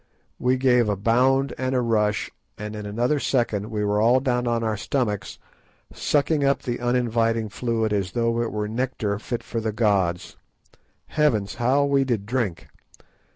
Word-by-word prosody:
We 125 +1 +2
gave 125 -3 +3
a 105 - +1
bound 130 +6 +2
and 130 0 -1
a 125 - +2
rush, 105 -3 0 0.3
and 105 0 -6
in 105 -1 -6
another 120 +8 0
second 115 -7 0
we 105 -2 -2
were 105 +1 +1
all 120 +4 +5
down 125 -2 0
on 115 -1 0
our 110 -1 0
stomachs 105 -3 -2 0.6
sucking 145 0 +1
up 140 0 +1
the 120 -2 -3
uninviting 115 -2 +1
fluid 110 0 -1
as 95 -3 -1
though 115 0 +1
it 120 - -2
were 105 0 -2
nectar 110 -3 -2
fit 120 +2 -4
for 115 - -4
the 110 0 -1
gods. 100 -6 0 0.7
Heavens, 115 -10 +1
how 135 +4 +3
we 140 -1 +3
did 115 -7 -1
drink! 110 -6 -2
115 Hz, 165 wpm, -24 LUFS, 105-125 Hz, 0.7 s, all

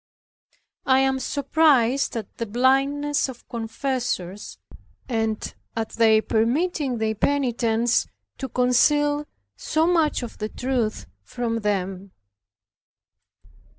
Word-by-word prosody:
I 265 0 +5
am 265 0 +1
surprised 275 -3 +2
at 215 -3 -7
the 230 - -3
blindness 275 +5 +1
of 250 -2 -11
confessors, 230 -4 -3 0.5
and 225 -3 -2 0.2
at 225 -1 -2
their 220 -1 +4
permitting 265 +4 0
their 220 -1 0
penitents 240 -2 +1 0.3
to 265 - -4
conceal 290 +4 +2 0.3
so 315 +1 0
much 330 -6 +2
of 240 - -8
the 215 0 -3
truth 245 -4 -2 0.2
from 230 - -3
them. 195 -2 -3
245 Hz, 100 wpm, -24 LUFS, 225-280 Hz, 0.5 s, I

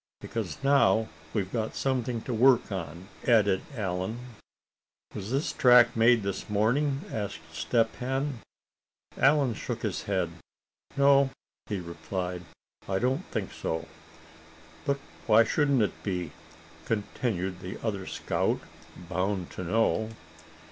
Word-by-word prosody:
"Because - - -4
now 115 -6 +4 0.2
we've 95 0 -2
got 110 -2 -2
something 125 -3 -1
to 125 - -3
work 120 0 +4
on," 85 -1 -5 0.2
added 105 -5 +4
Allan. 95 0 -2 1.0
"Was 100 0 -5
this 135 +5 0
track 120 -1 +6
made 115 0 +5
this 100 +1 -4
morning?" 135 +7 +1
asked 100 -7 -5
Step 115 +7 +1
Hen. 135 +1 -2 0.8
Allan 140 -3 +4
shook - - -5
his - - -1
head. 95 -4 0 0.7
"No," 140 -1 +5 0.4
he 105 -4 -2
replied, 90 +1 -4 0.5
"I 95 - +1
don't 130 - 0
think 100 -4 -3
so." 80 0 -3 1.0
"But 140 -1 +1 0.3
why 110 +2 +7
shouldn't 140 -3 +2
it 105 - -3
be?" 90 -5 -3 0.5
continued 100 -3 -2
the 95 0 -6
other 100 -4 -2
scout, - - 0 0.5
bound 95 0 -1
to 95 - -6
know. 110 +3 +1
110 Hz, 120 wpm, -28 LUFS, 95-125 Hz, 1.0 s, why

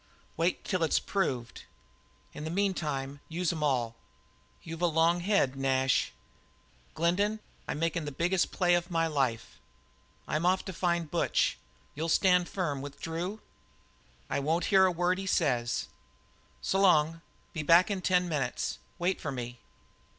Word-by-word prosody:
"Wait 170 +2 0
till 185 -3 -1
it's 160 - +3
proved. 130 - -2 0.7
In 150 - -7
the 160 - -3
meantime 150 -7 -1
use 170 +1 -1
em 160 - -5
all." 125 -6 +1 0.7
"You've 165 +1 -7
a 175 - +4
long 165 +2 +3
head, 175 -8 +2
Nash." 135 -1 +1 0.8
"Glendin, 200 +6 +1 0.3
I'm - - -2
makin' 165 0 -1
the 145 - -4
biggest 175 +6 +1
play 175 -2 +2
of 175 +1 +1
my 165 -2 +1
life. 135 -7 -1 0.7
I'm 155 +2 -1
off 185 +1 +2
to 190 - -5
find 170 -3 -1
Butch. - - +1 0.4
You'll 160 +3 -3
stand 180 +1 +4
firm 150 -8 -2
with 140 0 -8
Drew?" 175 +6 -4 0.9
"I - - -1
won't 160 +5 0
hear 190 -1 +7
a - - +1
word 180 +2 +1
he 195 - -5
says." 125 -10 +1 0.8
"S'long! 165 -4 +3 0.3
Be 160 - -2
back 170 +6 +5
in 195 -2 -2
ten 180 -1 +2
minutes. 140 -7 -2 0.2
Wait 180 +2 0
for 145 - -3
me." 120 -2 -6
165 Hz, 150 wpm, -30 LUFS, 145-180 Hz, 0.9 s, hear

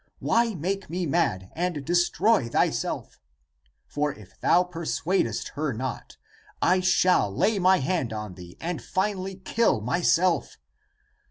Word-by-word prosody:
Why 230 -2 +1
make 190 +4 -3
me 175 +2 -2
mad, 115 - 0
and 170 -5 -2
destroy 175 - +2
thyself? - - -1 0.7
For 145 0 -1
if 105 -7 -15
thou 180 +1 +4
persuadest 165 - -2
her 145 -1 -2
not 125 +2 -5 0.4
I 185 +1 +3
shall 185 - +3
lay 205 - +1
my 185 +1 +5
hand 140 -4 -1
on 105 -3 -5
thee 90 -1 -12
and 170 -1 -4
finally 190 0 -2
kill 195 - +1
myself. 170 - +1
175 Hz, 125 wpm, -26 LUFS, 125-185 Hz, 0.7 s, my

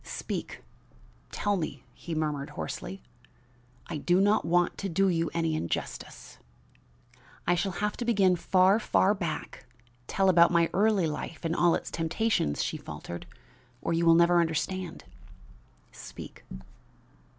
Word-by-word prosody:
"Speak! - - -5 0.7
tell 205 0 0
me," 170 -5 -4
he 170 -2 -6
murmured 150 -2 -2
hoarsely. 185 +2 -5 0.8
"I - - -5
do 175 +5 +2
not 205 +2 +3
want 175 +1 +2
to 195 - -3
do 195 +3 +2
you 165 -2 0
any 165 -1 0
injustice." 85 - -5 1.1
"I 175 - +3
shall 185 +2 -1
have 210 +4 -2
to - - -3
begin 195 -6 +3
far, 185 +4 +3
far 205 -2 +3
back; 170 -9 -5 0.4
tell 195 0 +1
about 170 -2 +6
my 170 -1 +2
early 205 -2 +3
life 155 +2 -5
and 165 +1 0
all 175 -1 +4
its - - -5
temptations," 165 - 0
she - - -3
faltered, 85 0 -8 0.5
"or 165 - -2
you 165 +1 +1
will 165 - +7
never 170 +1 +5
understand." 170 +2 -3 0.9
"Speak." - - -11
175 Hz, 140 wpm, -28 LUFS, 165-195 Hz, 1.1 s, will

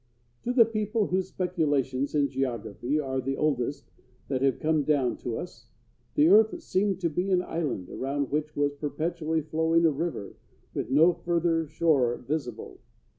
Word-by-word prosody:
To 245 - +1
the 245 -2 +6
people 215 0 -1
whose 185 0 -1
speculations 145 -8 -1
in 145 -1 +3
geography 125 0 -2
are 130 -2 -2
the 135 +1 -2
oldest 140 -1 -1 0.4
that 130 -2 -1
have 135 -2 +2
come 155 -1 +2
down 140 -4 +1
to 120 -2 -4
us, - - -9 0.5
the 150 - +5
earth 220 +3 +5
seemed 190 -1 0
to 170 - +1
be 180 +5 -1
an 180 -1 +2
island 145 - -3
around 140 +4 -3
which 150 +1 -2
was 145 0 +1
perpetually 155 +3 -2
flowing 160 +2 +2
a 160 - +5
river 150 -8 -4 0.4
with - - -3
no 160 +6 +5
further 170 -2 0
shore 145 -6 +2
visible. 135 -1 -5
150 Hz, 160 wpm, -27 LUFS, 135-170 Hz, 0.5 s, the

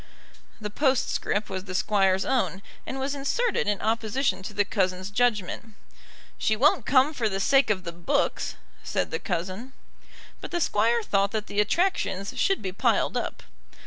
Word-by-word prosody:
The 210 -2 -5
postscript 260 -4 0
was 190 -1 -5
the 185 -2 -6
Squire's 190 -1 +2
own, 235 -7 0 0.2
and 270 - -4
was 270 +2 -1
inserted 290 - 0
in 205 -2 +1
opposition 220 -1 0
to 190 - -6
the 205 - +1
cousin's 185 -1 -1
judgment. 220 -1 0 0.6
"She 220 - +2
won't 265 +1 +3
come 270 +3 +4
for 230 -6 0
the 195 -1 -2
sake 270 +7 +4
of 190 -3 0
the 170 - -5
books," 170 0 -1 0.3
said - - -2
the 160 - -2
cousin. 185 +8 -4 0.7
But - - -6
the 345 - -1
Squire 230 -4 +2
thought 200 -1 +1
that 215 -1 -1
the 205 - -3
attractions 210 - 0
should 390 - +1
be 190 - -2
piled - - +1
up. - - -3
210 Hz, 165 wpm, -26 LUFS, 190-265 Hz, 0.7 s, come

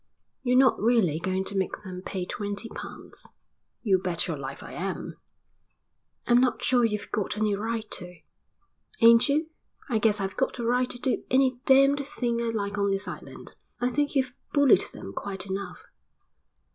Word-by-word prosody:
"You're 250 -1 +2
not 260 -5 +4
really 215 -9 +3
going 185 +2 -1
to 200 - -6
make 190 +1 -2
them 185 -2 -7
pay 185 -2 -4
twenty 205 +3 -4
pounds?" - - -6 0.5
"You 195 -5 +3
bet 180 -2 -1
your 165 - -2
life 135 -1 -7
I - - -9
am." 190 +1 -4 1.1
"I'm 240 +1 +5
not 255 -1 +1
sure 245 -2 +3
you've 210 -3 -1
got 210 0 -2
any 210 -1 +1
right 220 +2 -2
to." 180 -1 -3 0.8
"Ain't 230 +4 +7
you? 310 +3 +1 0.4
I 225 -3 +1
guess 215 -1 +3
I've 195 0 -3
got 265 - 0
the 240 - -4
right 250 +1 +2
to - - -8
do 250 +1 0
any 260 -1 +3
damned 275 +1 +5
thing 240 -4 -2
I - - -1
like 205 -2 -2
on 200 0 +2
this 195 +1 -1
island." - - -9 0.3
"I 245 - +1
think 290 +3 -1
you've 260 -2 +1 0.2
bullied 285 -2 +5
them - - -9
quite 195 -2 -5
enough." 190 -2 -5
220 Hz, 175 wpm, -27 LUFS, 195-250 Hz, 1.1 s, Ain't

